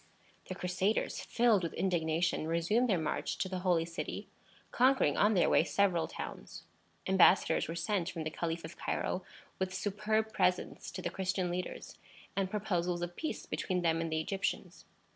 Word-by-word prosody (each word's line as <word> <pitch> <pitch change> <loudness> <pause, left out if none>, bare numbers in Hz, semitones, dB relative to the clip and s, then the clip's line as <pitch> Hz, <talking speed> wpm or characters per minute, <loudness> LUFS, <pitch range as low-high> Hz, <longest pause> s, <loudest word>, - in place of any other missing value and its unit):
The 185 - -5
Crusaders, 185 +3 0
filled 230 -5 +3
with 170 -2 -4
indignation, 165 -3 0
resumed 175 +10 +2
their 190 - +3
march 155 -2 -2
to - - -1
the 185 -1 -3
Holy 175 -3 +2
City, 165 0 -5 0.4
conquering 255 - +4
on 210 +1 +4
their 175 - +4
way - - +5
several 185 -5 +2
towns. - - -8 0.4
Embassadors 190 0 +4
were 165 - -4
sent 175 +1 -1
from 165 -3 -4
the 155 - -3
Caliph 165 +1 -3
of - - -10
Cairo - - -2 0.4
with 190 0 -2
superb 215 +2 0
presents 180 0 0
to - - -7
the - - -2
Christian 185 -1 -1
leaders, 180 +1 -5 0.4
and 195 -1 0
proposals 180 -4 -1
of 175 0 -5
peace 315 - -4
between 180 -2 -2
them 165 -1 +2
and 165 -1 -3
the 160 - +1
Egyptians. 195 +5 -3
180 Hz, 165 wpm, -33 LUFS, 170-200 Hz, 0.4 s, way